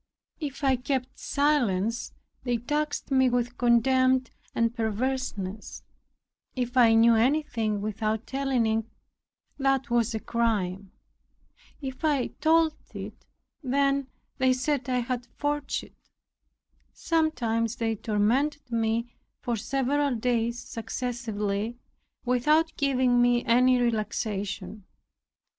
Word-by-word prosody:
If 290 -2 -5
I 265 -2 +3
kept 255 +1 -3
silence, 235 -7 +1 0.3
they 245 -2 0
taxed 295 +5 -2
me 260 -1 +4
with 245 0 -1
contempt 255 +2 +3 0.2
and 230 0 +1
perverseness; 220 -3 -3 0.7
if 245 -1 -3
I 235 -3 +6
knew 230 +1 +6
anything 230 -4 +1
without 215 +1 -2
telling 270 -3 0
it, 220 0 +1 0.8
that 270 -2 +1
was 235 -1 +2
a - - -1
crime; 200 -5 -1 0.9
if 265 +1 -6
I 290 -5 +1
told 320 0 +4 0.2
it, - - -8 0.3
then 275 0 +1 0.3
they 260 0 +4
said 265 +1 -1
I 250 -1 +1
had 245 0 -3
forged 290 -1 -2
it. - - -16 1.0
Sometimes 240 -9 0
they 225 -2 -1
tormented 240 +7 0
me 230 +1 0 0.3
for 240 - -2
several 275 +4 0
days 235 0 0
successively, 225 -2 -3 0.5
without 300 +7 +2
giving 255 -3 +2
me 245 0 +3
any 250 +2 +4
relaxation. 215 -3 -2
245 Hz, 110 wpm, -27 LUFS, 225-270 Hz, 1.0 s, I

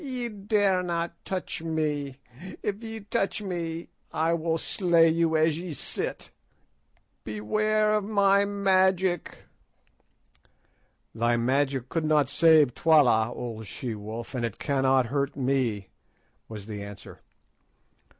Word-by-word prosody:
"Ye 250 -4 -3
dare 205 -2 +1
not 170 -1 -2
touch 185 -3 -4
me. 150 -4 -2 0.5
If 205 +1 -3
ye 225 -1 -7
touch 200 0 -1
me 170 -4 -4 0.2
I 160 +1 +1
will 165 0 0
slay 170 -1 +3
you 165 0 +2
as 155 0 +2
ye 175 -2 -6
sit. - - -3 0.9
Beware 215 - 0
of 210 -1 +1
my 200 -1 +3
magic." 190 -3 +1 1.7
"Thy 120 +1 +1
magic 135 +1 0
could 165 -2 -1
not 150 -3 +3
save 155 -6 +5
Twala, 125 -9 +4
old 110 -3 -6
she 120 +2 -5
wolf, 110 +4 -7
and 125 -2 -3
it 115 -4 -3
cannot 135 -2 +2
hurt 140 0 -1
me," 125 -7 -1 0.6
was 105 -3 -8
the 105 -2 -6
answer. 100 0 -10
160 Hz, 120 wpm, -27 LUFS, 130-190 Hz, 1.7 s, save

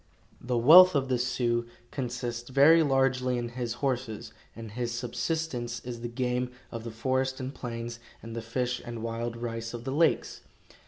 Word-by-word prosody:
The 125 0 0
wealth 170 +9 +9
of 135 -1 +1
the 125 -2 +1
Sioux 120 -1 0 0.2
consists 120 -2 -4
very 145 +5 +6
largely 135 -3 +2
in 120 -1 -3
his 120 -1 -3
horses, 125 -5 -3 0.2
and 115 -1 -8
his 120 +1 -3
subsistence 120 0 -3
is 120 -1 -7
the 120 - -3
game 125 +1 -1 0.2
of 115 -2 -6
the 115 - -5
forest 130 +3 -1
and 130 +1 -5
plains 115 -2 -6 0.2
and 115 0 -7
the 115 - -3
fish 125 +2 -2
and 115 -2 -6
wild 115 +1 -3
rice 115 0 -4
of 120 - -7
the 130 - -3
lakes. 165 +3 +1
120 Hz, 170 wpm, -28 LUFS, 115-130 Hz, 0.2 s, wealth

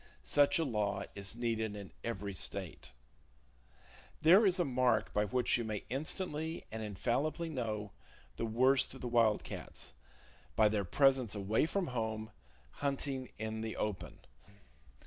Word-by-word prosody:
Such 140 - +4
a 165 - +1
law 105 -5 0
is 100 +2 -4
needed 115 -3 -1
in 100 -2 -8
every 100 -3 -3
state! 85 -7 -4 1.3
There 190 +7 +8
is 185 0 +3
a 175 - +3
mark 125 -5 +2
by 105 0 +2
which 125 +2 +1
you - - -1
may 110 -2 -3
instantly 155 +3 -2
and 110 0 -4
infallibly 130 - -1
know 110 -8 -3 0.4
the 115 - -2
worst 130 +4 +3
of - - -11
the 125 - -3
wild 115 -3 +3
cats—by 65 - -3
their 105 -2 0
presence 130 0 +3
away 105 +8 +1
from 195 +2 0
home, 110 -4 -3 0.4
hunting 135 - -2
in 110 0 -3
the 110 0 -4
open. 95 -5 -3
115 Hz, 140 wpm, -34 LUFS, 105-135 Hz, 1.3 s, There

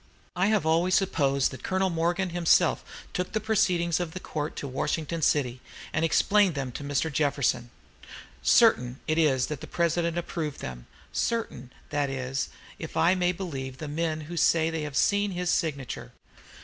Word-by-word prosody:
I 180 +3 +2
have 210 -6 +2
always 170 +3 +3
supposed 140 -8 +2
that 130 - -9
Colonel 190 0 0
Morgan 175 +2 0
himself 170 -1 +3 0.3
took 180 +4 -3
the 215 - +1
proceedings 180 -6 +1
of 170 -3 -3
the - - -3
court 150 -4 -4
to 140 - -5
Washington 155 +5 -2
city, 130 -5 +1 0.3
and 160 - +1
explained 195 +2 +3
them 135 -2 -3
to 145 - -7
Mr. 145 +2 -1
Jefferson. 135 -5 +1 0.7
Certain 125 +1 +4
it 155 +1 +1
is 135 -6 +3
that 150 -3 -5
the - - -7
President 170 0 0
approved 165 -4 -3
them, - - -7 0.3
certain, 220 - -2 0.2
that 145 -1 0
is, 130 0 -3 0.3
if - - -6
I 170 +3 +5
may 180 -1 +2
believe 135 -8 -5
the 155 - -6
men 155 +1 -2
who 170 +3 -7
say 165 0 +3
they 160 -1 -2
have 150 -2 -4
seen 205 -1 +2
his 180 0 -1
signature. 140 -6 -2
160 Hz, 170 wpm, -27 LUFS, 140-175 Hz, 0.7 s, I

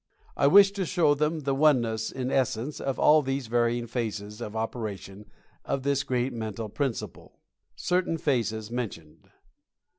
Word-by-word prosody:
I 140 - +3
wish 195 +5 +7
to 200 -2 -3
show 160 -4 +3
them 150 +2 -1
the 140 -1 -1
oneness 120 -7 +2
in 130 0 -3
essence 130 +2 -1
of 135 -1 -2
all 155 +1 +5
these 135 -1 -2
varying 120 +1 0
phases 110 -2 -4
of 105 -2 -6
operation 105 -3 -5 0.3
of 135 - -2
this 140 0 +1
great 125 -1 -1
mental 110 -1 -5
principle. 135 +1 -4 0.4
CERTAIN 180 -2 0
PHASES 115 -7 -1
MENTIONED. 100 -11 -6
125 Hz, 145 wpm, -27 LUFS, 110-140 Hz, 0.4 s, wish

